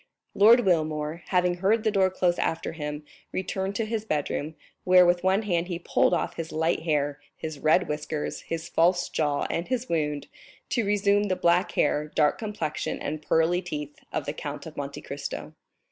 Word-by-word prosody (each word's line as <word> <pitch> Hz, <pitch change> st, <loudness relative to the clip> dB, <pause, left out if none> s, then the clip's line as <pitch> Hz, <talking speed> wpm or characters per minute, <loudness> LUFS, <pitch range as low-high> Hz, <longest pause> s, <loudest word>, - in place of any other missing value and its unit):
Lord 230 Hz, +5 st, +7 dB
Wilmore, 155 Hz, -4 st, 0 dB
having 180 Hz, -1 st, +2 dB
heard 210 Hz, +5 st, +2 dB
the 220 Hz, -, +2 dB
door 190 Hz, -2 st, +3 dB
close 180 Hz, -1 st, +1 dB
after 165 Hz, -, -1 dB
him, 150 Hz, -2 st, -5 dB, 0.3 s
returned 190 Hz, +1 st, -2 dB
to 225 Hz, -, 0 dB
his 220 Hz, -1 st, -2 dB
bedroom, 155 Hz, -3 st, -2 dB, 0.3 s
where 180 Hz, 0 st, +7 dB
with 175 Hz, 0 st, +2 dB
one 190 Hz, +3 st, +3 dB
hand 175 Hz, -4 st, 0 dB
he 175 Hz, -2 st, -3 dB
pulled 170 Hz, -, +2 dB
off -, -, -1 dB
his 165 Hz, -1 st, -4 dB
light 160 Hz, +2 st, +1 dB
hair, 145 Hz, -3 st, 0 dB, 0.2 s
his 155 Hz, -2 st, -6 dB
red 160 Hz, +5 st, +3 dB
whiskers, 150 Hz, 0 st, -3 dB
his 165 Hz, 0 st, -5 dB
false 175 Hz, +2 st, +2 dB
jaw, 145 Hz, -2 st, 0 dB
and 170 Hz, +1 st, -2 dB
his 255 Hz, 0 st, -2 dB
wound, 150 Hz, -3 st, -1 dB, 0.4 s
to 235 Hz, -, +1 dB
resume 205 Hz, 0 st, +3 dB
the 190 Hz, -2 st, 0 dB
black 175 Hz, +2 st, +2 dB
hair, 150 Hz, 0 st, +1 dB
dark 150 Hz, -1 st, +3 dB
complexion, 205 Hz, -9 st, -3 dB
and 155 Hz, +1 st, -4 dB
pearly 165 Hz, +3 st, +2 dB
teeth 150 Hz, -5 st, -5 dB, 0.2 s
of -, -, -2 dB
the -, -, -3 dB
Count -, -, -6 dB
of -, -, -9 dB
Monte -, -, -5 dB
Cristo. -, -, -6 dB
170 Hz, 180 wpm, -26 LUFS, 155-190 Hz, 0.4 s, Lord